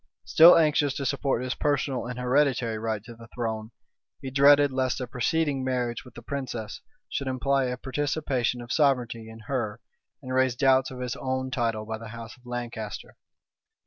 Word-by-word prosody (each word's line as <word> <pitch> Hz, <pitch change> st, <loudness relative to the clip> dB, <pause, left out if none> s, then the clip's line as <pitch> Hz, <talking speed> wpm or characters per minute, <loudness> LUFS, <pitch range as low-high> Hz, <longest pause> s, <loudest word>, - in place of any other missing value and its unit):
Still 160 Hz, +11 st, +8 dB
anxious 150 Hz, -3 st, +3 dB
to 140 Hz, -, -3 dB
support 135 Hz, -3 st, 0 dB
his 130 Hz, 0 st, -2 dB
personal 140 Hz, -4 st, -1 dB
and 125 Hz, 0 st, -5 dB
hereditary 125 Hz, -3 st, +1 dB
right 110 Hz, -2 st, -2 dB
to 120 Hz, +2 st, -10 dB
the 115 Hz, 0 st, -13 dB
throne, 110 Hz, -2 st, -3 dB, 0.5 s
he 130 Hz, -, -6 dB
dreaded 140 Hz, +1 st, +6 dB
lest 130 Hz, -1 st, 0 dB
a 130 Hz, -, -2 dB
preceding 135 Hz, +3 st, 0 dB
marriage 125 Hz, -2 st, -2 dB
with 125 Hz, -2 st, -16 dB
the 120 Hz, -, -10 dB
princess 120 Hz, -5 st, -5 dB, 0.3 s
should 140 Hz, -, -3 dB
imply 135 Hz, +1 st, +1 dB
a 125 Hz, 0 st, -2 dB
participation 130 Hz, -2 st, -1 dB
of 120 Hz, -, -4 dB
sovereignty 125 Hz, -6 st, +1 dB
in 110 Hz, 0 st, -11 dB
her, 110 Hz, -3 st, -3 dB, 0.4 s
and 130 Hz, -, -5 dB
raise 130 Hz, -1 st, +2 dB
doubts 130 Hz, 0 st, +3 dB
of 125 Hz, -1 st, -8 dB
his 125 Hz, -1 st, -3 dB
own 130 Hz, 0 st, -2 dB
title 115 Hz, -4 st, -1 dB
by 110 Hz, 0 st, -5 dB
the 115 Hz, -, -8 dB
house 115 Hz, +3 st, -9 dB
of 125 Hz, -2 st, -21 dB
Lancaster. 120 Hz, -4 st, -6 dB
125 Hz, 175 wpm, -27 LUFS, 115-135 Hz, 0.5 s, Still